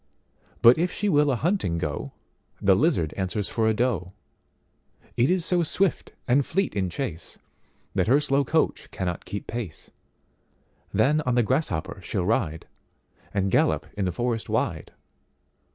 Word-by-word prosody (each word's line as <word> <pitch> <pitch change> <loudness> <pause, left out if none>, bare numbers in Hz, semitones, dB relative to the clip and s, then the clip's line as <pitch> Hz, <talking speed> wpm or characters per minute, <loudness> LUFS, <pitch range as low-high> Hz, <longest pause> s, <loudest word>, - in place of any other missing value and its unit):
But 120 +5 +8
if 180 +2 +1
she 210 - -1
will 150 -4 +4
a 135 - +2
hunting 150 - 0
go, 75 -3 -3 0.5
The 95 -1 +4
lizard 115 - +1
answers 95 0 -1
for 110 -1 +1
a - - +2
doe; 105 -7 -1 1.0
It 120 +2 +3
is 180 -2 +1
so 180 -1 +2
swift 180 +3 0
and 135 +3 +4
fleet 195 +8 -1
in 95 -3 0
chase, 85 - -5 0.6
That 95 -1 +1
her 135 +5 +5
slow 140 -1 +1
coach 160 +4 0
cannot 90 -2 -4
keep 100 - -5
pace; 110 -10 -6 1.0
Then 140 +10 +3
on 125 -4 0
the 120 - +4
grasshopper 100 - -1
she'll 90 +1 -2
rideAnd 95 0 -4
gallop 75 -3 +2
in 100 - -1
the 90 - 0
forest 115 +4 -2
wide. - - -1
115 Hz, 150 wpm, -25 LUFS, 95-145 Hz, 1.0 s, But